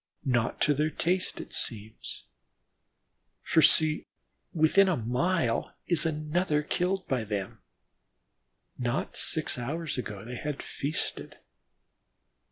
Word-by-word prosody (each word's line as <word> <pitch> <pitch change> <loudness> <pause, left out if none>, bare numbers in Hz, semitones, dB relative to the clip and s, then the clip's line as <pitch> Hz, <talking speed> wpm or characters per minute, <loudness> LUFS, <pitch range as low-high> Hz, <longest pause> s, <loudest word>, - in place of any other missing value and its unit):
Not 120 -3 +1
to 150 - +4
their 150 +2 +1
taste, 180 +4 0
it - - -8
seems, 110 -2 -2 1.2
for 160 - +4
see! 155 0 +5 0.4
within 175 +5 +4
a 180 - +1
mile 125 +2 0
is 170 -2 +2
another 155 0 0
killed 180 +4 -1
by 130 -6 0
them. 100 -3 -4 1.2
Not - - -1
six - - 0
hours 145 +3 -3
ago, 105 -4 -6
they 125 +1 -6
had 150 +1 -4
feasted. 145 +3 -4
150 Hz, 110 wpm, -29 LUFS, 120-170 Hz, 1.2 s, see